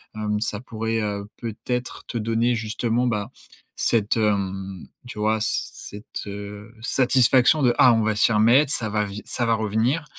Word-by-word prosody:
Hem, 105 -1 -2
ça 105 -2 -2
pourrait, 115 -1 -3
heu, 100 -1 -3
peut-être 120 +2 -4
te - - -4
donner, 115 +2 +1
justement, 115 +2 -1
bah, 105 -4 -2 0.5
cette, 110 -1 +1
hem, 95 -3 -1 0.2
tu 110 -3 -8
vois, 110 +1 +1
c - - -1 0.3
cette, - - -8
heu, 105 +2 -8
satisfaction 130 +3 +3
de: 120 -2 +4
«Ah, 125 -2 +7
on 115 - +2
va 110 0 0
s'y 105 - +3
remettre, 120 +7 +4
ça 110 - -1
va 105 0 0
vi 100 +1 -7
ça 120 - -1
va 115 0 +2
revenir». 110 +8 0
110 Hz, 170 wpm, -23 LUFS, 105-120 Hz, 0.5 s, Ah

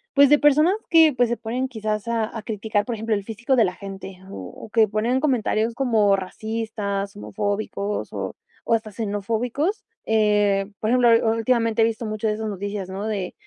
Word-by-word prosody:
pues, 280 0 +7
de 295 - +6
personas 305 +5 +5 0.2
que, 320 -3 +6
pues, 245 -1 +2
se 240 - -1
ponen 240 +4 -2
quizás 215 -2 -3
a 225 -2 +1
a 225 - -4
criticar, 210 0 -1
por 240 -2 -3
ejemplo, 220 0 -1
el 200 - -3
físico 235 +5 -1
de 230 - +5
la 180 - -1
gente, 195 -1 -8
o - - -8 0.3
o - - -13
que 220 -1 +4
ponen 235 +5 0
comentarios 230 -4 +1
como 220 -7 +3
racistas, 205 0 -4
homofóbicos, 205 0 -3
o - - -4 0.3
o - - +1
hasta 220 -1 0
xenofóbicos, 230 - -2 0.2
eh, 210 -2 +2
por 215 - -1
ejemplo, 245 -1 +4 0.2
u - - 0
últimamente 230 -1 +1
he - - +6
visto 230 0 -2
mucho 215 +1 -2
de 210 - +1
esas 215 0 -4
noticias, 200 -1 -4
¿no?, 200 +3 -4
de, 195 -4 -3
220 Hz, 190 wpm, -23 LUFS, 205-235 Hz, 0.3 s, pues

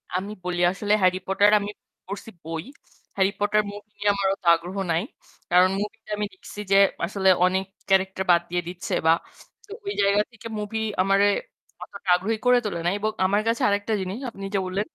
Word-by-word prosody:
আমি 195 +3 -2
বলি 180 -1 -2
আসলে 205 +2 -1
'Harry 185 0 +3
Potter' 200 +2 +4
আমি 205 - -4 0.4
পড়ছি 200 +3 -7
বই। 165 0 -4 0.5
'Harry 195 0 +2
Potter' 210 +1 +2
মুভি 205 +1 -11
নিয়ে 205 0 +1
আমার 200 -1 0
অত 195 - -41
আগ্রহ 175 +4 -7
নাই। 165 +4 +1 0.5
কারণ 180 +1 +6
মুভি 210 +2 -5
টা - - -17
আমি 210 - -1
দেখছি 190 +2 -11
যে 195 - +6 0.3
আসলে 190 +1 +1 0.2
অনেক 190 +1 +1 0.2
ক্যারেক্টার 190 0 +2
বাদ 170 - +5
দিয়ে 175 0 0
দিচ্ছে 180 +1 -5
বা - - +7 0.6
তো 405 - -16
ওই 400 - -2
জায়গা 200 +1 +4
থেকে 230 0 -10
মুভি 210 +2 -3 0.2
আমারে 195 +1 +3 0.6
অতটা 200 -2 -8
আগ্রহী 215 +5 -1
করে 250 0 +6
তোলে 175 -5 -2
নাই। 175 - +2
এবং 215 +1 0
আমার 200 +2 +2
কাছে 230 0 +1
আরেকটা 205 +2 0
জিনিস 190 +3 -4
আপনি 195 -3 -8
যে 195 - +3
বললেন 195 +3 -2
195 Hz, 195 wpm, -24 LUFS, 185-205 Hz, 0.6 s, বা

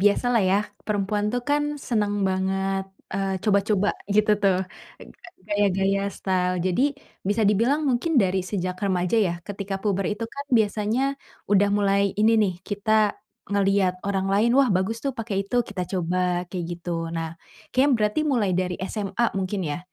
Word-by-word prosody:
biasalah 230 +4 +3
ya 195 - +4 0.3
perempuan 205 0 0
tuh 245 - -1
kan 290 0 +3 0.3
seneng 210 -4 +1
banget, 190 +1 -1 0.3
eee, 195 0 -1
coba-coba 205 -1 +2 0.3
gitu 215 0 +4
tuh, 195 -2 +4 0.9
gaya 205 0 +2
gaya, 195 +1 +1 0.2
style, 180 -1 0
jadi 185 +7 +1 0.5
bisa 210 +2 +1
dibilang 235 +9 +2
mungkin 255 +7 0
dari 190 0 +1
sejak 185 -2 -2
remaja 180 +2 +1
ya 185 -6 +2
ketika 200 -1 -4
puber 195 -3 0
itu 230 - -5
kan 280 0 -6
biasanya 215 +3 0 0.5
udah 205 0 +4
mulai 200 -1 +2 0.2
ini 220 +2 +5
nih, 190 -3 0
kita 210 +1 +1 0.3
ngelihat 195 -2 +2
orang 195 -1 0
lain 215 +4 +3
wah 275 -3 +5
bagus 190 +4 0
tuh 275 - +1
pakai 210 -3 -1
itu, 245 - -2
kita 195 -2 -3
coba 180 0 0
kayak 180 -2 -3
gitu. 175 +1 -6 0.2
Nah 165 -1 -4 0.4
kayaknya 270 +3 +4
berarti 210 +7 +1
mulai 245 -10 +1
dari 180 0 -1
SMA 200 +3 -2
mungkin 190 +1 -2
ya, 145 +1 -2
200 Hz, 155 wpm, -24 LUFS, 190-215 Hz, 0.9 s, ini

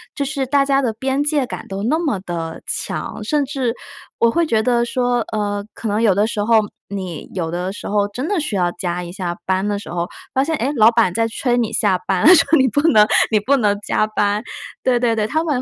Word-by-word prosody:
就 285 - -1
是 275 -1 -2
大 280 +2 +2
家 275 0 +2
的 235 -4 -1
边 265 +4 -1
界 295 -2 +1
感 - - -8
都 195 +1 -5
那 300 +9 +1
么 290 - -1
地 165 -3 -5
强， - - -4
甚 290 +6 +1
至 265 -4 -2 0.4
我 230 0 +3
会 340 +5 +1
觉 220 -7 +1
得 240 -1 +2
说 245 0 0
呃， 205 -1 -2
可 225 - -5
能 210 +2 0
有 210 -5 +4
的 205 +2 +3
时 215 -2 -2
候 225 0 +4 0.3
你 185 -5 -6
有 165 -3 -2
的 180 +2 -3
时 200 - -8
候 205 0 +1
真 250 +8 -5
的 405 -1 0
需 300 -9 -3
要 175 -2 +1
加 175 0 -4
一 175 - -8
下 175 -2 -4
班 190 +1 0
的 205 -1 -1
时 200 - -9
候， 170 0 -2 0.3
发 265 - +2
现 320 +2 -1
哎 270 0 -1
老 220 -2 +6
板 230 -6 +2
在 225 +2 +1
催 240 +2 -1
你 230 -2 0
下 205 -4 +2
班， 185 -2 +1
说： 325 0 +4
“你 265 - +4
不 285 +4 +1
能 210 -5 +6 0.2
你 215 - +3
不 270 +7 +2
能 205 -5 +1
加 215 - 0
班。” 205 -1 0 0.4
对 250 -2 +2
对 235 -2 +1
对， 215 -1 0
他 315 +7 0
们 290 -6 -1
225 Hz, 260 characters per minute, -19 LUFS, 200-265 Hz, 0.4 s, 老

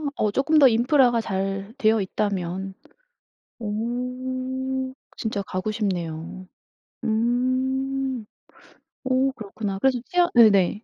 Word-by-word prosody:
어 210 -1 +1
쪼끔 305 +6 +2
더 280 -3 +8
인프라가 240 0 +4
잘 195 +1 -3
되어 220 -3 +3
있다면 190 -1 -2 0.9
오. 255 +4 -3 0.2
진짜 215 -3 -2
가고 185 +3 -3
싶네요. 180 -3 -4 0.6
음. 255 +2 0 0.8
오 260 +1 +2
그렇구나. 205 -3 -5
그래서 260 +2 +2
치아 355 -1 +2
네네. 210 -3 +5
230 Hz, 195 characters per minute, -24 LUFS, 200-260 Hz, 0.9 s, 더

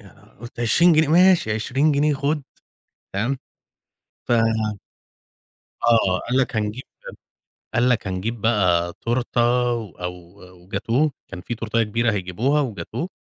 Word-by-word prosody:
أنا - - -19
قُلت 120 +1 -9
20 170 +9 +4
جنيه! 155 -1 +3
ماشي 175 - +4
20 135 +8 +1
جنيه 145 +1 +2
خد، 145 +2 -1 0.7
تمام؟ 120 +7 -1 0.9
ف - - -2 1.6
آه، 110 -6 +3
قال 125 - 0
لك: 130 -4 0
"هنجيب" 105 +3 -2 0.9
قال 120 +1 +3
لك: 120 -5 +1
"هنجيب 100 +5 -3
بقى 90 -6 +2
تورتة 120 +1 -1 0.3
و 115 -4 -5
أو 90 +1 -5 0.5
وجاتوه 115 +10 0 0.2
كان 95 - -8
فيه 120 - -5
تورتاية 115 0 -1
كبيرة 115 +1 0
هيجيبوها 105 +10 0
وجاتوه 135 - -4
120 Hz, 125 wpm, -22 LUFS, 105-140 Hz, 1.6 s, 20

